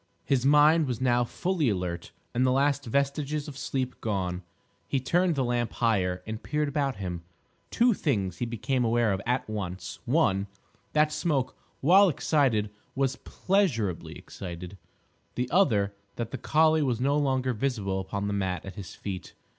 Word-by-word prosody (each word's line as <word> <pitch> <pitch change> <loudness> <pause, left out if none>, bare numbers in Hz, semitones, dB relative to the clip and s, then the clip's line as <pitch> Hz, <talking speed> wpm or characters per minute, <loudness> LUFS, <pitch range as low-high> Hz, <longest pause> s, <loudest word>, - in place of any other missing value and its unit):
His 135 -1 +2
mind 150 +2 +5
was 125 -3 -2
now 120 -1 +3
fully 170 +3 0
alert, 90 -4 -3 0.2
and 125 - +2
the 130 - +4
last 140 +1 +2
vestiges 140 +4 -1
of 145 - -8
sleep 130 -2 -3
gone. 95 -4 -2 0.5
He 135 - 0
turned 175 +6 +2
the 135 - +1
lamp 120 -2 -1
higher 90 -6 +1
and 110 0 -5
peered 150 0 -1
about 140 -2 -1
him. 90 -3 -5 0.5
Two 240 0 +3
things 105 - -1
he 120 - -1
became 125 +3 -1
aware 115 -2 +2
of 95 - -2
at 125 +1 0
once: 95 -4 -5
one, 115 -8 +2 0.5
that 150 0 +3
Smoke, 140 -6 -1 0.3
while 190 +7 +6
excited, 130 -10 +1 0.2
was 135 -1 0
pleasurably 140 - 0
excited; 90 +1 -8 0.6
the 125 0 -1
other, 110 - +3 0.2
that 115 -1 -4
the 135 - -5
collie 155 0 +3
was 125 -5 0
no 140 +3 +2
longer 130 -3 +1
visible 105 -6 -1
upon 100 +1 -3
the 100 - -1
mat 95 -2 -2
at 95 - -7
his 95 0 -9
feet. 95 -3 -6
125 Hz, 160 wpm, -28 LUFS, 100-145 Hz, 0.6 s, while